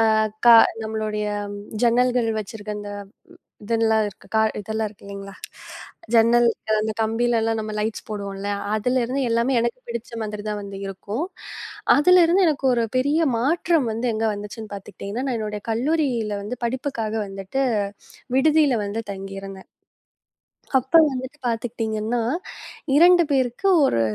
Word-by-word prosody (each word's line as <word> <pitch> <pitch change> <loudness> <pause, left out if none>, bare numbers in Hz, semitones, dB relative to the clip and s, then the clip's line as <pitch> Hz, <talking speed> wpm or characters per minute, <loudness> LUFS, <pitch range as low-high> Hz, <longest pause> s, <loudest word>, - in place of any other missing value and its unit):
அ - - +3 0.3
கா 235 - +10 0.3
நம்மளுடைய 215 -1 -2 0.6
ஜன்னல்கள் 245 0 +3
வச்சிருக்கிற 210 0 -6
அந்த 205 0 -7 0.8
இதுலாம் 220 -1 +2
இருக்கு. 200 - -16 0.3
இதுலாம் 220 +2 -2
இருக்கு 205 -1 -18
இல்லீங்களா? 195 0 -8 0.8
ஜன்னல் 235 +1 +5 0.3
அந்தக் 215 0 -2
கம்பியில 230 +2 +1
எல்லாம் 225 0 0
நம்ம 215 0 -5
லைட்ஸ் 215 +1 -3
போடுவோம் 200 -2 -5
இல்ல. 200 +1 -4 0.3
அதுல 250 +4 +1
இருந்து 265 +3 -1
எல்லாமே 235 +3 +2
எனக்குப் 240 +2 -3
பிடிச்ச 235 0 -5
மாதிரிதான் 210 -1 -4
வந்து 200 -1 -8
இருக்கும். 205 - -4 0.7
அதுல 360 +5 +6
இருந்து 370 +3 +4
எனக்கு 290 -3 -2
ஒரு 235 -1 +1
பெரிய 285 +5 +2 0.2
மாற்றம் 315 +1 +1
வந்து 230 +3 -2
எங்க 220 +1 0
வந்துச்சுன்னு 210 +1 -8
பாத்துக்கிட்டீங்கன்னா 200 +4 -6
நான் 250 - -1
என்னுடைய 210 -1 -4
கல்லூரியில 240 -4 0
வந்து 225 +5 -5
படிப்புக்காக 240 -3 -3
வந்துட்டு 195 +7 -3 0.7
விடுதியில 295 -2 +4
வந்து 210 +3 -3
தங்கி 195 0 -7
இருந்தேன். 195 -1 -10 1.1
அப்ப 265 +6 -3 0.2
வந்து 260 0 -4 0.2
பாத்துக்கிட்டீங்கன்னா 225 0 -2 0.8
2 350 +2 +7
பேருக்கு 260 +7 +1 0.2
ஒரு 115 - +2
225 Hz, 130 wpm, -23 LUFS, 210-255 Hz, 1.1 s, கா